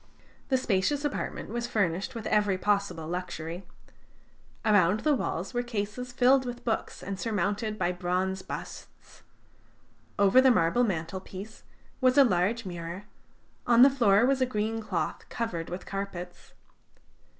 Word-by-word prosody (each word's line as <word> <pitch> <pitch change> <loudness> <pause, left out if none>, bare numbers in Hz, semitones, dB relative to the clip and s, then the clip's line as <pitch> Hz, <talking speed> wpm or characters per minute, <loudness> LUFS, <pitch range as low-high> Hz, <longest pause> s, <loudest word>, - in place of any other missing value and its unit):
The 265 - +3
spacious 255 +5 0
apartment 290 - -3
was 235 +2 -3
furnished 200 +2 -1
with 225 -1 -6
every 205 -3 +2
possible 200 -5 0
luxury. 175 0 -5 1.0
Around 205 -1 +4
the 305 - +3
walls 190 -8 -2
were 245 - +1
cases 240 +1 -4
filled 260 +2 +4
with 245 -1 -6
books 225 -2 -2
and 195 -1 -5
surmounted 215 0 -1
by 180 - 0
bronze 185 +1 -1
busts; - - -9 1.0
over 200 +6 +6
the 260 - +6
marble 200 +1 +3
mantelpiece 190 +2 -4 0.4
was 255 +1 +4
a 280 - +9
large 220 +1 +1
mirror; 175 +1 -6 0.6
on 240 0 +7
the 275 - +7
floor 230 -5 +4
was 270 0 +2
a 255 - +3
green 225 -1 -2
cloth 215 - -3
covered 180 -8 -3
with 180 +2 -6
carpets. 180 -3 -6
205 Hz, 140 wpm, -28 LUFS, 185-240 Hz, 1.0 s, a